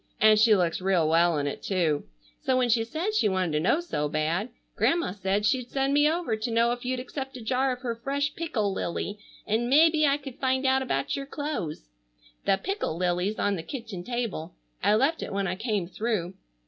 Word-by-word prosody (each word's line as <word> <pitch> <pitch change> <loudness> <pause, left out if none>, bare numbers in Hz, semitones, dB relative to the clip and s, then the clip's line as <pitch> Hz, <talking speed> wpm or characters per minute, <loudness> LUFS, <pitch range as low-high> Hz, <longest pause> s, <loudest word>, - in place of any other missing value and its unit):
And 215 0 +6
she 215 0 +6
looks 175 -2 0
real 185 -4 +2
well 165 0 +3
in 145 - -1
it 145 - -4
too. 165 -7 0 0.4
So 260 - +1
when 250 -1 +2
she 230 0 +3
said 320 - -3
she 425 - +3
wanted 185 -3 0
to 150 - +1
know 190 - +2
so 150 - -2
bad, 160 +8 -1 0.3
Grandma 340 - +2
said 195 +1 -1
she'd 250 +2 +1
send 270 0 0
me 295 +1 +5
over 335 -7 -1
to 220 +3 -3
know 230 +1 +3
if 245 0 -4
you'd 255 0 -1
accept 265 +1 -6
a - - -9
jar 260 +3 +1
of 250 0 -5
her 240 -3 -2
fresh 280 +5 -2
pickle 220 -12 -1
lily, 200 +3 -3 0.3
and 225 +3 0
mebbe 310 +2 +5
I 280 - +2
could 275 -2 -10
find 260 0 +1
out 265 0 +3
about 135 - -1
your 275 0 -5
clothes. 280 - -4 0.6
The 195 - +3
pickle 390 - -3
lily's 180 +3 0
on 200 -1 +1
the - - -4
kitchen 225 - -7
table. 230 -8 -4 0.3
I 205 +2 +4
left 275 +8 +2
it - - -5
when 195 0 -1
I 180 - -1
came 210 -3 -1
through. 190 -1 -2
225 Hz, 210 wpm, -27 LUFS, 185-265 Hz, 0.6 s, And